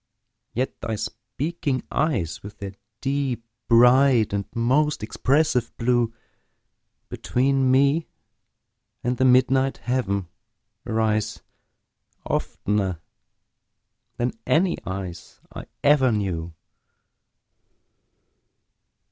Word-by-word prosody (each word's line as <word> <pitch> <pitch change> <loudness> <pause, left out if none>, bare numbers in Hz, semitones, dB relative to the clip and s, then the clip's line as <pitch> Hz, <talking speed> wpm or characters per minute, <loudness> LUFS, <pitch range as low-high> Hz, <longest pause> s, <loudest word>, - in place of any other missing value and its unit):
yet 130 +3 -3
thy 110 - -2
speaking 135 +6 -3
eyes, 115 - 0
With 100 +1 -10
their 100 -1 -6 0.3
deep, 135 -4 -1 0.2
bright 125 -1 +5
and 100 -1 -1
most 130 +3 +1
expressive 130 +3 +1
blue 120 -1 +2 1.0
Between 135 +1 +1
me 140 +5 +3 1.0
and 125 +1 0
the 130 - +2
midnight 130 +1 +4
heaven 100 -7 -1 0.6
arise, 110 -2 0 0.8
Oftener 95 -4 -1 1.2
than 120 +1 -1
any 175 +3 +3
eyes 90 -3 -6
I - - -8 0.2
ever 140 -3 +5
knew. 85 -6 -2
125 Hz, 80 wpm, -24 LUFS, 105-135 Hz, 1.2 s, bright